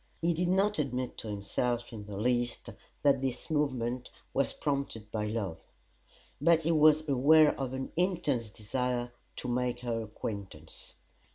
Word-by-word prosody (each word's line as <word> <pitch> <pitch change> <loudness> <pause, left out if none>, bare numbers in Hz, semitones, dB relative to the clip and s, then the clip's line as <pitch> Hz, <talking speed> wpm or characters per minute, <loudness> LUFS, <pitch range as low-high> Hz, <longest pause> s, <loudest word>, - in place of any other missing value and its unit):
He 170 +1 +2
did 175 +2 0
not 195 +1 +2
admit 130 -3 -2
to - - -6
himself 115 +4 -2
in 105 -2 -7
the 100 -1 -6
least 120 +2 0 0.3
that 140 -2 +4
this 135 +3 -3
movement 130 -5 0 0.2
was 140 - +1
prompted 140 -7 -3
by 105 -1 -1
love; 100 -7 -3 0.8
but 165 +1 +5
he 165 +1 +1
was 155 0 +5
aware 150 +3 +6
of 135 -2 -2
an 130 0 -4
intense 165 - 0
desire 120 +3 -2 0.2
to - - -5
make 125 0 0
her 115 -2 -1
acquaintance. 100 -7 -7
125 Hz, 150 wpm, -31 LUFS, 115-150 Hz, 0.8 s, aware